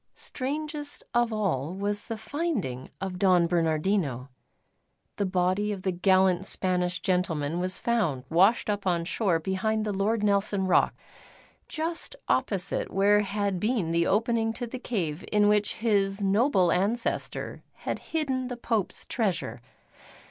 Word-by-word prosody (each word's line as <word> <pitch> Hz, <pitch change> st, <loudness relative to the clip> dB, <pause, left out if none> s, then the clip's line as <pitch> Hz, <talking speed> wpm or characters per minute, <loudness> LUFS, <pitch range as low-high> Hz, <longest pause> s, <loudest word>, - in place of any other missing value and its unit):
Strangest 295 Hz, +2 st, -4 dB
of 240 Hz, -1 st, +2 dB
all 180 Hz, -7 st, -1 dB
was 205 Hz, +1 st, -2 dB
the 225 Hz, -, -4 dB
finding 220 Hz, -, -3 dB
of 185 Hz, -1 st, -4 dB
Don 180 Hz, -3 st, +4 dB
Bernardino. 160 Hz, -, 0 dB, 0.9 s
The 200 Hz, -, 0 dB
body 185 Hz, +3 st, +1 dB
of 195 Hz, -2 st, -5 dB
the 190 Hz, -, +1 dB
gallant 185 Hz, 0 st, +3 dB
Spanish 180 Hz, -2 st, +2 dB
gentleman 170 Hz, -4 st, 0 dB
was 185 Hz, +1 st, 0 dB
found 195 Hz, -, 0 dB
washed 190 Hz, -, +3 dB
up 205 Hz, -2 st, -2 dB
on 170 Hz, -2 st, +1 dB
shore 185 Hz, -1 st, +1 dB
behind 195 Hz, +6 st, -1 dB
the 210 Hz, -, -1 dB
Lord 205 Hz, +3 st, 0 dB
Nelson 200 Hz, -1 st, +2 dB
rock, 185 Hz, -, +3 dB, 0.7 s
just 330 Hz, +8 st, -3 dB
opposite -, -, 0 dB
where 205 Hz, +1 st, +4 dB
had 200 Hz, -2 st, -1 dB
been 210 Hz, -5 st, 0 dB
the 170 Hz, 0 st, +2 dB
opening 225 Hz, +1 st, +1 dB
to 245 Hz, +2 st, -4 dB
the 250 Hz, +2 st, -7 dB
cave 175 Hz, -10 st, -3 dB
in 210 Hz, -1 st, +4 dB
which 210 Hz, 0 st, +2 dB
his 200 Hz, -3 st, +1 dB
noble 195 Hz, -2 st, +3 dB
ancestor 215 Hz, +6 st, -1 dB
had -, -, -4 dB
hidden 270 Hz, -5 st, -1 dB
the 245 Hz, -1 st, -5 dB
Pope's 225 Hz, -5 st, -2 dB
treasure. 175 Hz, -, -2 dB
200 Hz, 140 wpm, -27 LUFS, 180-225 Hz, 0.9 s, Don